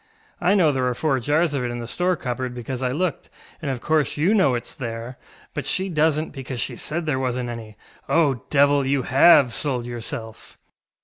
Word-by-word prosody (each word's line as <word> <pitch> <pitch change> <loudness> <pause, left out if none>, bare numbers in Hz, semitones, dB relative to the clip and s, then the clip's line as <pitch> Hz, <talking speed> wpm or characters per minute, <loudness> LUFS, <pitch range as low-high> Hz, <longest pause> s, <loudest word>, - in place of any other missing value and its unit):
I 200 - +3
know 170 -6 +4
there 130 -2 0
are 125 - -1
four 140 -1 +1
jars 150 +5 +1
of 135 -3 -1
it 120 - -2
in 120 - -4
the 120 - -5
store 180 +9 0
cupboard, 125 -3 -4
because 125 +1 -5
I 130 - 0
looked, 165 +6 -2 0.3
and 150 - -3
of 130 -3 -3
course 155 -2 +1
you 170 +8 +3
know 190 -12 +4
itŌĆÖs 120 - -5
there, 115 0 -6 0.3
but - - -3
she 190 0 -1
doesnŌĆÖt, 155 0 +1
because 130 -2 -6
she - - -3
said 165 +2 -3
there 145 -4 0
wasnŌĆÖt 125 -1 -2
any. 110 -3 -8 0.3
Oh, 145 -7 +2
Devil, 145 0 +4
you 135 -1 +1
have 135 -1 +6
sold 125 -4 -1
yourself! 115 -2 -7
135 Hz, 200 wpm, -23 LUFS, 125-155 Hz, 0.3 s, have